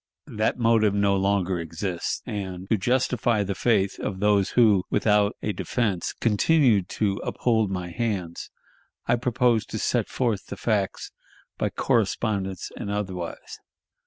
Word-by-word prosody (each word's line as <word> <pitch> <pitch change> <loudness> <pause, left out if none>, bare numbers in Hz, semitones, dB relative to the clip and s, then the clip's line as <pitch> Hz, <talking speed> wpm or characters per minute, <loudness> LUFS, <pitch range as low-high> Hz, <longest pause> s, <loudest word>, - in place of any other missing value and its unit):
That 110 -1 -1
motive 115 -3 +3
no 100 -1 +3
longer 95 -2 +1
exists; 85 +2 -3
and, 95 -2 -5
to - - +5
justify 120 -1 +1
the 100 0 -2
faith 95 0 +1
of 95 -2 -4
those 100 -1 +3
who, 105 -6 +5
without 105 -1 +2
a 105 - -1
defense 105 -7 -1
continued 115 - +2
to 100 -2 +1
uphold 110 -4 +1
my 90 -2 -4
hands, 95 -6 -3 0.6
I - - +3
propose 120 -2 +2
to - - -5
set - - 0
forth 115 -6 -1
the - - -7
facts 105 -4 -1 0.5
by - - +1
correspondence 95 -5 -1
and - - -5
otherwise. 95 -4 -5
100 Hz, 135 wpm, -25 LUFS, 95-115 Hz, 0.6 s, to